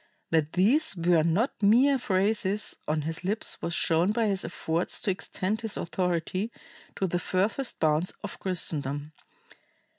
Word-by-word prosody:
That 160 -2 +1
these 225 - +3
were 170 -1 +3
not 175 - 0
mere 255 +7 +5
phrases 205 0 0
on 155 0 0
his 165 +3 -3
lips 205 +4 -1
was 170 - -1
shown 170 +4 +2
by 230 +1 +1
his 195 -2 0
efforts 165 +2 -2
to 195 - +2
extend 190 +3 -3
his 225 -2 -1
authority 180 +4 -2 0.4
to 195 - -1
the 175 -1 -1
furthest 205 +9 -1
bounds 155 +3 +2
of - - -6
Christendom. 150 -5 -2
185 Hz, 145 wpm, -27 LUFS, 165-210 Hz, 0.4 s, mere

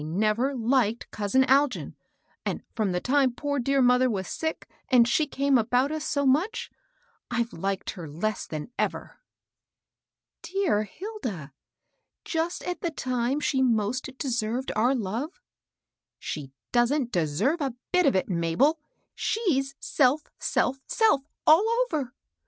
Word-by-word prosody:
never 215 - 0
liked 235 -2 +1
•ousin 220 +6 +2
Algin; 275 0 +2 0.5
and - - -3
from 215 -4 0
the 180 - 0
time 265 +4 +2
poor 285 +3 -2
dear 275 +2 +2
mother 250 +1 +4
was 190 -5 -2
sick, 320 0 -3 0.2
and 245 -3 +6
she 300 +4 +2
came 275 -2 +2
about 250 +5 +1
us 310 -1 -3
so 285 -2 0
much, 325 - +1 0.6
I've 240 -1 -1
liked 195 +2 -2
her 175 -5 -8
less 205 +9 -2
than 155 +9 -6
ever." - - -2 1.2
^^ - - -64
Dear 360 - +1
Hilda! 220 - -6 0.7
just 330 +1 -2
at 360 0 -4
the 340 - 0
time 255 -2 -1
she 270 -2 +1
most 235 0 +1
de 280 - -3
served 240 +2 -1
our 240 +5 +3
love/ 245 - -3 0.4
" - - -63 0.3
She 140 -3 -5 0.2
don't 245 +1 +2
deserve 180 - +1
a 270 -4 -2 0.2
bit 360 -1 +4
of - - +3
it, 185 - +1
Mabel; 180 - +2 0.3
she's 275 - 0
self, 285 +2 +1
self, 270 +2 0
self, 440 - +3 0.2
all 315 +6 +7 0.2
over. 280 - -3
255 Hz, 145 wpm, -27 LUFS, 215-290 Hz, 1.2 s, all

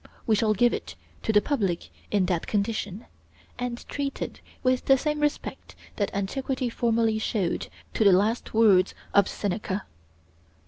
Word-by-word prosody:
We 225 - +3
shall 215 0 +3
give 240 +4 +4
it - - -5 0.3
to - - 0
the 210 -1 +4
public 200 - -1 0.2
in 200 -3 +2
that 175 -2 -1
condition, 205 -1 -2 0.5
and 245 -1 -4
treat 280 -1 -3
it - - -5 0.2
with 255 -1 +2
the 270 - +6
same 300 +2 -1
respect 295 -1 -2 0.2
that 205 - +1
antiquity 255 +5 -2
formerly 225 -2 +1
showed 200 -5 -1 0.3
to - - +2
the 200 - +7
last 210 +6 +2
words 205 -5 +4 0.2
of 200 -1 +5
Seneca. 200 0 -3
220 Hz, 150 wpm, -26 LUFS, 200-245 Hz, 0.5 s, the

